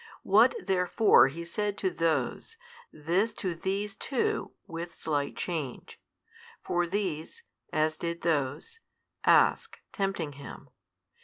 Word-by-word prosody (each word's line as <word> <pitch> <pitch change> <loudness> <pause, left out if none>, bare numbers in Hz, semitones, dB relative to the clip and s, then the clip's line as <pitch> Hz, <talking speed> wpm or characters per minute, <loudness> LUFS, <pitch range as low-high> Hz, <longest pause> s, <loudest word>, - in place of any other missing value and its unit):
What - - +5
therefore 180 - +5
He 165 +5 -6
said 205 +3 -2
to 190 - 0
those, 165 - -1 0.3
this 180 +9 0
to 185 -5 -3
these 195 +4 -2
too 265 +1 -1
with 170 -2 -7
slight 145 -3 -2
change: 155 -8 -5 0.6
for 175 0 0
these 185 - -3 0.3
(as 155 0 +1
did 170 0 -4
those) 160 - -1 0.5
ask, - - +4
tempting 195 -7 -2
Him. 140 0 -11
170 Hz, 110 wpm, -29 LUFS, 155-195 Hz, 0.6 s, What